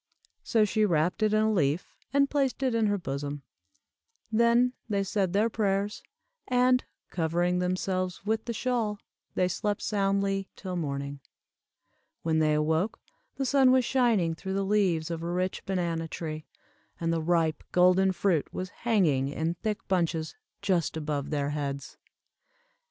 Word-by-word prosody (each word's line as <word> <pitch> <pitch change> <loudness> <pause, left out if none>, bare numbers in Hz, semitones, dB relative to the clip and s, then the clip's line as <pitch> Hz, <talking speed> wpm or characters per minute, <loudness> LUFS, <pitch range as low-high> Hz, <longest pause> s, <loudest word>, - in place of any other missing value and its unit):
So 220 -2 +3
she 215 +1 +1
wrapped 175 -1 +1
it 215 -1 +3
in 215 0 +3
a 220 0 +2
leaf, 155 -2 0 0.2
and 280 0 +4
placed 275 -2 0
it 255 -2 +1
in 225 -2 +2
her 205 0 +1
bosom. 145 -3 -4 0.9
Then 235 +2 +4 0.2
they 200 -2 +1
said 195 -1 0
their 205 +4 +3
prayers, 205 -2 -1 0.5
and, 250 0 +3 0.3
covering 175 +2 +1
themselves 185 +1 -1
with 220 +1 0
the 235 - -2
shawl, 230 -2 -1 0.4
they 180 - +2
slept 205 +3 -2
soundly 195 -1 0
till 185 -2 -5
morning. 140 -3 -3 1.0
When 160 -1 +2
they 155 -1 +3
awoke, 160 +6 0 0.4
the 270 - -2
sun 265 -1 +5
was 255 -1 +4
shining 230 -11 +2
through 190 +4 -5
the 195 0 0
leaves 185 -6 +1
of 165 -1 -3
a 170 - -3
rich 185 +1 -1
banana 170 -4 -1
tree, 155 -1 -6 0.5
and 165 0 0
the 165 - 0
ripe 160 -2 +1
golden 185 +1 +5
fruit 180 -4 0
was 185 0 -4
hanging 180 - +1
in 160 +4 -1
thick 215 +5 -4
bunches 165 -4 0 0.3
just 180 -5 +1
above 150 -2 -3
their 145 -1 -1
heads. 140 -2 -4
185 Hz, 150 wpm, -28 LUFS, 160-215 Hz, 1.0 s, sun